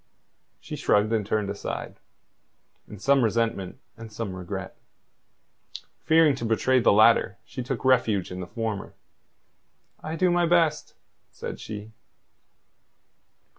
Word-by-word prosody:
She - - -7
shrugged 105 +2 +2
and 110 -2 +1
turned 100 0 -1
aside, 100 - -6 0.9
in 105 - -10
some 135 +5 +3
resentment 115 -4 -1 0.2
and 115 -1 -11
some 105 -3 -5
regret. 90 -1 -6 1.3
Fearing 160 -2 +5
to - - -6
betray 115 +3 +2
the 115 - +4
latter, 110 -2 +4
she 130 - -6
took 125 0 -4
refuge 115 -8 +2
in 90 - -6
the 90 - -6
former. 110 -1 -4 1.1
"I 155 +1 -5
do 180 +1 +2
my 175 -1 +2
best," 165 -3 +1 0.3
said - - -7
she. 105 0 -8
115 Hz, 125 wpm, -26 LUFS, 105-135 Hz, 1.3 s, Fearing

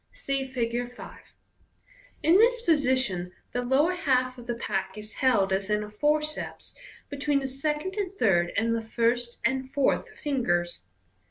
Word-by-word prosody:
(See 275 - -2
Fig. 245 -1 -2
5.) - - -10 1.0
In 330 +4 +6
this 480 +1 +4
position 255 - +1 0.2
the 245 - -1
lower 270 +8 +2
half 255 -8 +1
of 240 - -12
the 240 - -1
pack 195 -3 -3
is 215 0 -9
held 205 -8 +3
as 195 +1 -1
in 210 0 +1
a 210 - -9
forceps 300 +6 -1 0.3
between 285 0 0
the 270 -1 -1
second 300 +7 -2
and 395 -3 -1
third 190 - +2
and 230 +2 +2
the 230 - -1
first 235 +1 0
and 260 +2 0
fourth 275 -2 +1
fingers. 175 - -1
255 Hz, 155 wpm, -27 LUFS, 225-295 Hz, 1.0 s, In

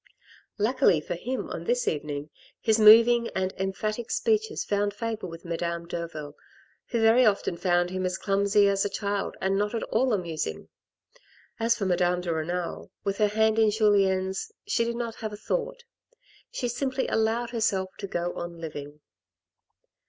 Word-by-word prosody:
Luckily 220 - +3
for 150 - -5
him 245 +10 -4
on - - -5
this - - 0
evening, 150 -1 -3 0.3
his 220 0 +2
moving 230 +2 +7
and 190 0 0
emphatic 215 +4 -2
speeches 445 -2 0
found 205 0 0
favour 220 -2 -4
with 165 +1 -10
Madame 170 0 -3
Derville, 165 -4 -5 0.5
who 235 - -1
very 225 +3 +5
often 200 -5 +2
found 175 0 +1
him 185 0 -2
as 185 0 -1
clumsy 200 +1 +3
as 195 0 +2
a 205 - -1
child 200 0 -3
and 195 +1 +1
not 210 +2 -1
at 225 - -2
all 250 +3 +1
amusing. 165 - -3 0.9
As 230 +1 +2
for 205 - -2
Madame 180 -1 +1
de 175 -2 -2
Renal, 170 +2 -3
with 200 +1 -2
her 210 - +4
hand 220 +1 +2
in 220 -1 +5
Julien's, 195 - +1 0.2
she 255 -13 +2
did 235 0 -2
not 235 -1 -4
have 220 -2 -5
a - - -6
thought; - - -3 0.7
she 245 - -2
simply 260 +2 -1
allowed 225 +2 0
herself 195 -5 0
to 200 - -4
go 175 -1 -2
on 175 0 -6
living. 150 -2 -8
205 Hz, 165 wpm, -27 LUFS, 175-230 Hz, 0.9 s, moving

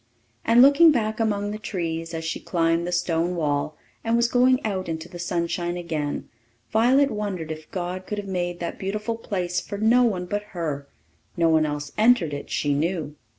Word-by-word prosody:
And 235 +2 +6
looking 285 +4 +7
back 220 -5 -1
among 205 -2 0
the 215 - -5
trees, 165 -5 -3
as 160 0 -4
she 160 - -2
climbed 165 0 0
the - - -2
stone 175 0 0
wall 150 -2 -1 0.3
and 230 0 +1
was 235 0 +3
going 255 +1 +4
out 190 -4 -2
into 160 +1 -4
the 175 -1 -10
sunshine 175 0 -2
again, 155 -4 -3 0.4
Violet 260 +6 +4
wondered 195 -7 -3
if 155 0 -8
God 185 0 -4
could 210 - -3
have 205 -1 -5
made 175 -2 -2
that 170 - -4
beautiful 210 +4 -2
place 180 -5 -2
for 200 - -6
no 225 +4 +4
one 195 -7 +1
but 205 +3 -2 0.2
her; 145 -4 -3 0.5
no 165 -1 +3
one 160 -1 +3
else 145 -1 -4
entered 215 -9 +4
it, 145 - -6
she 145 -1 0
knew. 155 0 -1
180 Hz, 190 wpm, -24 LUFS, 165-215 Hz, 0.5 s, looking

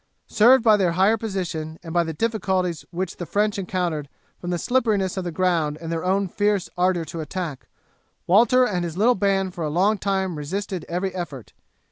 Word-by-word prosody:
Served 240 +3 +5
by 215 -2 +6
their 180 -4 +1
higher 195 +5 +4
position, 180 -7 -4
and 165 -2 -7
by 175 -1 +3
the 165 - -4
difficulties 185 -3 -1
which 180 +1 -4
the 175 - -5
French 210 0 0
encountered 175 -6 -2 0.3
from 175 - -6
the 175 - 0
slipperiness 210 -4 +1
of 190 - -3
the 175 - -4
ground 165 -4 0
and 165 0 -6
their 165 -1 -2
own 195 +2 +1
fierce 205 0 0
ardour 180 -2 +1
to 160 +2 -6
attack, 155 -2 -5 0.6
Walter 240 +7 +5
and 180 -7 -1
his 170 0 -5
little 230 +5 +4
band 195 -3 0
for 170 - -5
a 155 - -1
long 195 +7 +2
time 190 -4 -1
resisted 185 +3 -4
every 180 +2 -2
effort. 150 - -7
185 Hz, 190 wpm, -23 LUFS, 170-200 Hz, 0.6 s, by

